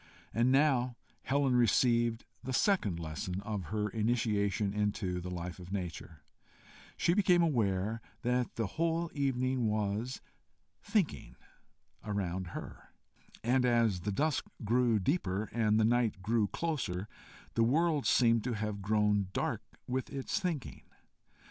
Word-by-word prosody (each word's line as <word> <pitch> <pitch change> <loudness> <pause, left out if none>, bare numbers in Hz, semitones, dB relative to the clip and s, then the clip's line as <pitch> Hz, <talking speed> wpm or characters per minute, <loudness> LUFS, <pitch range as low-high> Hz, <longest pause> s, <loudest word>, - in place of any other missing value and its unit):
And 120 +3 +3
now 130 -3 +3 0.3
Helen 135 -1 +1
received 120 -1 +3 0.2
the 130 - -4
second 115 - +2
lesson 85 +3 -4
of 105 -3 -4
her 105 +3 -1
initiation 105 -3 0
into 100 -3 -1
the 90 - -5
life 90 0 -5
of 90 0 -10
nature: 85 -5 -5 0.7
she 170 - +3
became 180 -3 +4
aware 110 - 0 0.2
that 125 0 0
the 115 - 0
whole 165 - -1
evening 130 -3 0
was 105 +3 -1 0.6
thinking 205 -9 -1 0.7
around 95 -3 -2
her, - - -10 0.5
and 125 +2 +3
as 115 -6 +3
the 100 +4 -2
dusk 150 +8 0 0.2
grew 120 0 +3
deeper 105 - -1
and 110 -1 +2
the 110 - +4
night 115 -4 +1
grew 110 0 +2
closer, 105 - -2 0.5
the 115 - +3
world 150 +4 +2
seemed 115 -3 +4
to 125 - -1
have 105 -2 -3
grown 105 -1 +2
dark - - -1 0.2
with 130 +1 -2
its 140 +9 -2
thinking. 170 - -3
115 Hz, 130 wpm, -32 LUFS, 100-130 Hz, 0.7 s, became